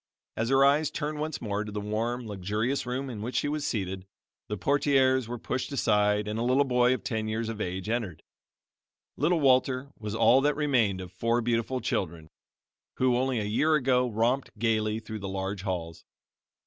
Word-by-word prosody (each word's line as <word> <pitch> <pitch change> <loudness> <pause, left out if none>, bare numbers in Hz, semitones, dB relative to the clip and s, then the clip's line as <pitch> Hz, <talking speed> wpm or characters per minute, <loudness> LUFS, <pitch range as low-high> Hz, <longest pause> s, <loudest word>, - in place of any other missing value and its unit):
As 115 +1 -1
her 135 0 +5
eyes 145 +2 +3
turned 150 0 -4
once 155 0 -3
more 105 -2 -2
to 105 - -7
the 105 - -3
warm, 115 +4 -2
luxurious 105 +6 -2
room 130 +2 -2
in 115 -5 -6
which 120 +4 -5
she - - +1
was 150 0 -2
seated, 95 -3 -3 0.4
the 105 - -3
portieres 130 -1 +2
were 120 +1 -4
pushed 130 +4 -3
aside 105 -5 +2
and 105 +1 -2
a - - 0
little 130 +3 +3
boy 125 -1 +3
of - - -9
ten 110 -5 -2
years 110 +1 -2
of 110 -1 -5
age 95 +1 -3
entered. 110 -7 -3 0.9
Little 165 +4 +2
Walter 130 0 +2
was 105 -1 -4
all 115 +4 +5
that 145 +1 +2
remained 120 -11 +1
of 90 - -9
four 115 +1 0
beautiful 120 +2 -1
children, 85 -8 -3 0.7
who, 125 -1 +2
only 130 0 0
a - - -1
year 150 +10 +2
ago, 125 -3 +2
romped 115 +3 0
gaily 110 -1 +1
through 110 -1 -7
the 100 -1 -5
large 95 0 -3
halls. 85 -4 -4
115 Hz, 185 wpm, -28 LUFS, 105-130 Hz, 0.9 s, her